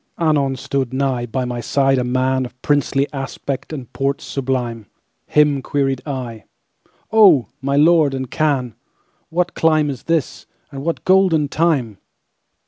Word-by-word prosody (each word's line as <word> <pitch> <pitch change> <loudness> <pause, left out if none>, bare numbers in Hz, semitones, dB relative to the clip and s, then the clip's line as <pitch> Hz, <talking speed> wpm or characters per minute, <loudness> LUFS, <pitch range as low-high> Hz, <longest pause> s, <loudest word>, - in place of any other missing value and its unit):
Anon 145 -5 +1
stood 135 0 -2
nighBy 130 -2 -1
my 120 -1 -4
side 135 +2 +1
a - - 0
manOf 130 0 0
princely 140 -1 +1
aspect 135 0 -5
and 135 -6 -8
port 140 +1 -1
sublimeHim 130 +3 -2
queried 135 -2 -1
I—"Oh, 135 - 0
my 140 +1 -1
Lord 155 -2 +4
and 130 -2 -5
Khan, 135 -6 0 0.6
What 175 +1 -1
clime 155 -2 +2
is 130 - -9
this, 165 -3 -1 0.2
and 135 -1 -7
what 165 +1 -3
golden 185 -6 +3
time?" 140 - 0
135 Hz, 125 wpm, -19 LUFS, 130-150 Hz, 0.6 s, Lord